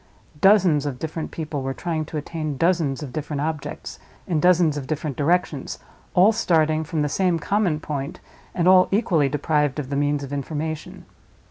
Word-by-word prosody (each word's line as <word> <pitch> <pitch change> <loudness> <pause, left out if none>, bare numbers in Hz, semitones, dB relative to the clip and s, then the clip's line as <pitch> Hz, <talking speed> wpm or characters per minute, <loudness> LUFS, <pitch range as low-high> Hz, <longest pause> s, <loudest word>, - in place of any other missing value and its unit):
Dozens 185 -8 +4
of 135 -3 -4
different 160 +2 -5
people 155 -3 -4
were 135 0 -3
trying 160 -3 -2
to 155 - -6
attain 155 -1 -4
dozens 165 -4 +1
of 130 -4 -8
different 150 0 -3
objects, 155 -1 -5 0.3
in 165 -4 0
dozens 170 -2 +4
of 140 -3 -5
different 150 -2 -3
directions, 155 -2 0 0.4
all 190 +4 +6
starting 160 -7 +2
from 155 -1 -2
the - - +1
same 180 +3 +1
common 180 -2 0
point 150 +3 -5 0.4
and 175 -1 +1
all 185 0 +7
equally 180 - +2
deprived 150 0 0
of 145 -2 -5
the - - -1
means 145 0 0
of 140 0 -7
information. 150 +2 -5
155 Hz, 170 wpm, -23 LUFS, 145-175 Hz, 0.4 s, all